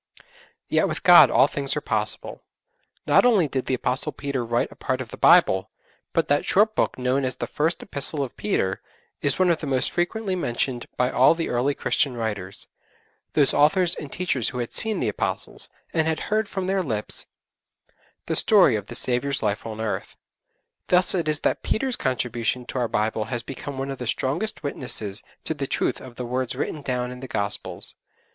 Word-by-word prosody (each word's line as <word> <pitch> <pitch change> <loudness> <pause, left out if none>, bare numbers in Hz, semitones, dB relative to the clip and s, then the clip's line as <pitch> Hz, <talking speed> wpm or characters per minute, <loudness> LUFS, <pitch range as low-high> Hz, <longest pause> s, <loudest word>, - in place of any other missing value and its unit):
Yet - - +2
with - - -4
God - - +9
all - - +5
things - - -2
are - - 0
possible. - - -2 0.6
Not - - +5
only 215 -10 +4
did 130 -2 -3
the 130 - +1
Apostle 130 +4 -1
Peter 140 -4 -3
write 120 +1 -1
a - - -12
part 130 0 -2
of 130 -3 -6
the - - -7
Bible, 95 0 +5 0.4
but - - +1
that 145 0 +2
short 215 +3 +3
book - - 0
known 130 +2 0
as 130 -1 -1
the - - -4
'First 160 +4 -1
Epistle 140 -3 +1
of 130 - -7
Peter,' 95 -2 -1 0.4
is 145 -1 +1
one 185 -2 +4
of 165 - 0
the 155 - -4
most 130 -2 0
frequently 190 +3 -1
mentioned 120 -5 -2
by 125 0 +1
all 130 +6 +5
the 165 - -3
earliest 130 +4 0
Christian 125 +1 +1
writers 100 -4 -4 0.7
those 145 -3 +3
authors 170 +5 +3
and 145 - -7
teachers 160 -10 -1
who 125 - -7
had 120 -2 -4
seen 220 -1 +1
the - - 0
Apostles, - - -3 0.2
and 160 -1 +1
had 160 -1 0
heard 215 -1 +1
from 190 -2 -3
their 190 +1 +1
lips 110 - -2 1.0
the - - -1
story - - +6
of - - -4
the - - -6
Saviour's 130 +2 0
life 105 +1 -1
on 110 -1 -6
earth. 110 -1 -4 0.7
Thus 180 0 +4
it 170 -4 -1
is 155 -1 +2
that - - 0
Peter's 255 +2 -1
contribution 125 -1 -1
to 130 - -4
our 120 - +1
Bible 110 0 -1
has 120 +1 -3
become 135 +1 -7
one 135 +1 -3
of 135 - -7
the 125 - -4
strongest 145 - -1
witnesses 115 -7 -2 0.2
to - - 0
the 140 -3 -4
truth - - -1
of 125 -2 -11
the 125 - -5
words 125 +1 -2
written 150 - -3
down 125 -2 -2
in 125 - -9
the 130 - -7
Gospels. 100 -3 -3
130 Hz, 195 wpm, -24 LUFS, 120-160 Hz, 1.0 s, God